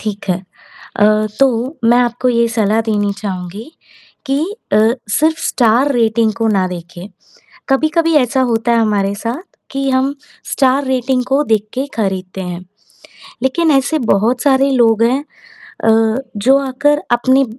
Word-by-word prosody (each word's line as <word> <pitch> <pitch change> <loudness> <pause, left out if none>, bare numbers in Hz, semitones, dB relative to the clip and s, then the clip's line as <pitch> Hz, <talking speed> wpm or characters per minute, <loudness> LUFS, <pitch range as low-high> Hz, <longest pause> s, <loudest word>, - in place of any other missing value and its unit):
ठीक 205 -2 -6
है। 180 - +1 0.6
अ, 205 - +3 0.4
तो 260 +2 +1
मैं 240 +2 +5
आपको 245 +1 0
ये 235 -1 +2
सलाह 220 -1 +1
देनी 205 -2 0
चाहूँगी 195 - -6 0.6
कि 275 0 0 0.3
अ, - - +4 0.3
सिर्फ़ 315 +8 +1
स्टार 245 +4 +2
रेटिंग 225 -2 +1
को 225 -1 -1
ना 195 -3 +1
देखें, 175 +1 -9 0.6
कभी-कभी 315 +4 +1
ऐसा 265 -1 +2
होता 230 +1 0
है 235 - +3
हमारे 205 -3 +1
साथ 235 - -5 0.3
कि 275 0 -2
हम 265 +2 +1 0.3
स्टार 270 +1 +1
रेटिंग 255 0 0
को 275 +2 +2
देख 215 -5 0
के 265 +2 -2
खरीदते 190 -3 -3
हैं। 180 0 -6 0.8
लेकिन 320 +5 +1
ऐसे 275 +3 +2
बहुत 230 +1 +1
सारे 275 -1 +3
लोग 230 -3 +3
हैं 255 +5 +1 0.6
अ, 225 - +3 0.5
जो 260 +7 +4
आकर 280 +2 0
अपने 260 +3 +3
240 Hz, 145 wpm, -15 LUFS, 215-270 Hz, 0.8 s, मैं